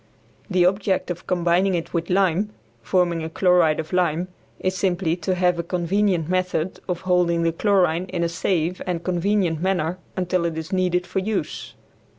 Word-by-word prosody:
The 180 -2 +3
object 190 -1 +1
of 175 - -7
combining 180 +1 +2
it 165 - -4
with 170 -1 -2
lime, 190 +1 +2 0.3
forming 175 -3 +1
a 160 - -4
chloride 175 -3 +3
of 160 +3 -5
lime, 180 0 +1 0.3
is 185 0 -1
simply 175 -3 0
to 185 +2 -1
have 180 -1 +2
a - - -1
convenient 180 0 0
method 185 -1 -1
of 175 -1 -2
holding 180 -2 +2
the 165 - +2
chlorine 180 -2 +2
in 180 -2 -2
a - - +2
safe 175 0 -1
and 175 -2 -2
convenient 180 -2 0
manner 185 -2 0 0.2
until 180 -1 0
it 165 -1 -2
is 160 +3 -5
needed 180 -1 +1
for 190 +1 -2
use. 195 -4 -3
180 Hz, 170 wpm, -23 LUFS, 170-185 Hz, 0.3 s, The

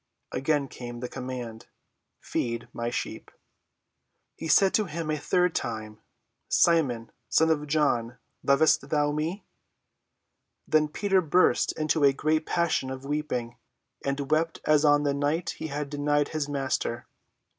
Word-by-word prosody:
Again 140 +2 0
came 120 -2 -8
the 125 - -4
command, 120 -3 -6 0.5
"Feed 115 0 -3
my 120 0 -2
sheep." 120 - -5 1.1
He 160 - -6
said 190 +5 +5
to 215 - +2
him 165 -2 -4
the 155 -1 0
third 180 +2 +2
time, 110 -2 -4 0.5
"Simon, 135 -10 +2 0.2
son 160 0 +4
of 150 -1 0
John, 125 -6 +1 0.2
lovest 145 +1 +3
thou 145 -1 +2
me?" 160 +6 -3 1.2
Then 155 -1 +3
Peter 195 +4 +1
burst 180 +2 +3
into 155 0 0
a 140 -1 +6
great 155 +3 0
passion 170 -6 0
of 130 +1 -6
weeping, 140 -5 -3 0.5
and 140 +1 -2
wept 160 +1 +1
as 150 -1 +4
on 145 -1 +5
the 145 -1 +1
night 145 +4 0
he - - -6
had 145 0 -3
denied 145 0 +1
his 155 -2 -2
Master. 135 -4 -2
145 Hz, 140 wpm, -27 LUFS, 130-155 Hz, 1.2 s, a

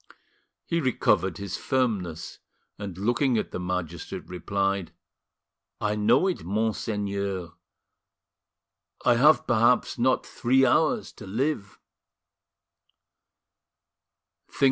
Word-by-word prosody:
He 170 -1 0
recovered 95 - +1
his 100 -2 -5
firmness, 105 - -2 0.4
and, 100 -4 -6
looking 120 +5 +1
at - - -2
the - - -4
magistrate, 90 -2 -4
replied: 100 +1 -2 0.9
"I 105 0 0
know 115 - +3
it, 185 -2 -1
monseigneur; 100 -3 -2 1.5
I 120 - +6
have 150 +5 +5
perhaps 120 +1 +2
not 130 +2 +2
three 130 +2 +2
hours 160 - +2
to 105 - -12
live." 105 -2 -2
105 Hz, 90 wpm, -26 LUFS, 95-125 Hz, 1.5 s, I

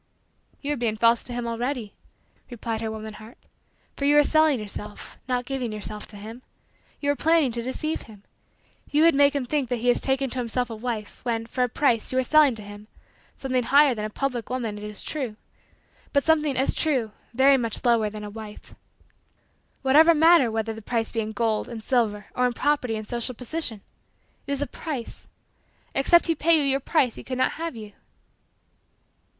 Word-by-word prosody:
"You 290 +1 -1
are - - -4
being 230 -3 -1
false 230 +1 +3
to 255 - -8
him 240 0 -3
already," 235 -1 -3 0.6
replied 230 -2 -4
her 225 - -2
woman 220 0 -6
heart, 220 +3 -13 0.6
"for 280 - -3
you 290 +1 +5
are 295 - +7
selling 310 -3 +3
yourself, 210 0 -8
not 250 -1 -1
giving 255 -3 -3
yourself 210 0 -6
to 210 - -12
him. 220 +4 -9 0.6
You 285 0 +1
are - - -1
planning 320 -3 +3
to 235 +1 0
deceive 310 +6 -3
him. 210 -3 -15 0.7
You 300 +2 +3
would 335 - +6
make 285 +1 +4
him 275 -3 -1
think 275 -1 -1
that 245 - +1
he 245 +1 +2
is - - 0
taking 270 -1 0
to 260 - -4
himself 245 0 -2
a - - -4
wife 220 -2 -5
when, 230 -2 -1
for 250 +2 -1
a 250 - 0
price, 230 -3 +1
you 255 - -1
are 260 - +3
selling 295 -1 +5
to 215 - -7
him 205 +1 -11 0.5
something 255 -2 -1
higher 280 +3 +5
than 215 -2 -5
a 215 - -3
public 245 -1 -3
woman, 240 -4 -3
it - - -10
is 210 -1 -4
true 260 -8 -4 0.8
but 280 -1 +3
something, 305 -4 +2
as 265 - +3
true, 260 -9 0 0.2
very 265 +3 +5
much 230 0 -3
lower 230 -3 +3
than 210 0 -8
a 210 - -6
wife. 215 -1 -10 1.1
What 275 +4 +7
matter 320 -5 +6
whether 225 0 -2
the 220 - -9
price 225 +1 -2
be 230 - -2
in 220 0 -2
gold 220 0 -1
and 230 -2 -7
silver 215 -5 0
or 250 0 +2
in 245 - -2
property 255 -3 0
and 215 -1 -6
social 240 +1 -2
position 250 -3 -2 0.7
it - - -4
is 280 0 0
a - - -2
price. 275 -2 -7 0.6
Except 340 +5 +4
he 330 - +2
pay 330 +1 +3
you 300 - +2
your 275 -1 +1
price 270 -4 +1
he - - -8
could 255 - -5
not 255 - +2
have 330 -5 -3
you." 210 -2 -9
245 Hz, 200 wpm, -25 LUFS, 220-280 Hz, 1.1 s, are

